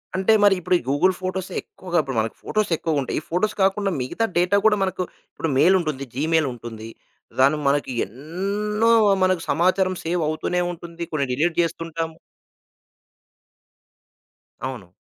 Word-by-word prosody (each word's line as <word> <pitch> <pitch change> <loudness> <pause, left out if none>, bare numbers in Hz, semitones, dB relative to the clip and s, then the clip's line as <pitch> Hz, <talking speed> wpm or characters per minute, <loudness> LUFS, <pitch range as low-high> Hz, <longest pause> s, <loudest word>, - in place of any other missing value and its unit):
అంటే 190 +4 +3
మరి 200 -1 +6
ఇప్పుడు 180 +1 +1
గూగుల్ 160 +7 +3
ఫోటోస్ 185 0 -3
ఎక్కువగా 180 -2 -5
ఇప్పుడు 135 -3 -5
మనకి 110 0 -2
ఫోటోస్ 215 -3 -1
ఎక్కువ 155 -2 0
ఉంటాయి. 130 - -3
ఈ - - -11
ఫోటోస్ 185 +6 0
కాకుండా 195 +1 +2
మిగతా 130 - -1
డేటా 180 +3 +3
కూడా 215 -1 +5
మనకు 185 -1 -1 0.3
ఇప్పుడు 165 - -3
మెయిల్ 170 +7 +6
ఉంటుంది. 150 -5 -3
జీమెయిల్ 160 +2 +2
ఉంటుంది. 115 -2 -8 0.5
దాన్ని 140 +4 +5
మనకి 140 -1 +1
ఎన్నో 200 - -2 0.3
మనకు 185 -2 +2
సమాచారం 185 +2 +2
సేవ్ 170 +1 0
అవుతూనే 155 +3 -1
ఉంటుంది 170 0 -8
కొన్ని 150 -3 0
డీలిట్ 160 +6 0
జేస్తుంటాము. 165 -1 -3 2.5
అవును. 120 -9 -8
170 Hz, 140 wpm, -23 LUFS, 145-190 Hz, 2.5 s, మరి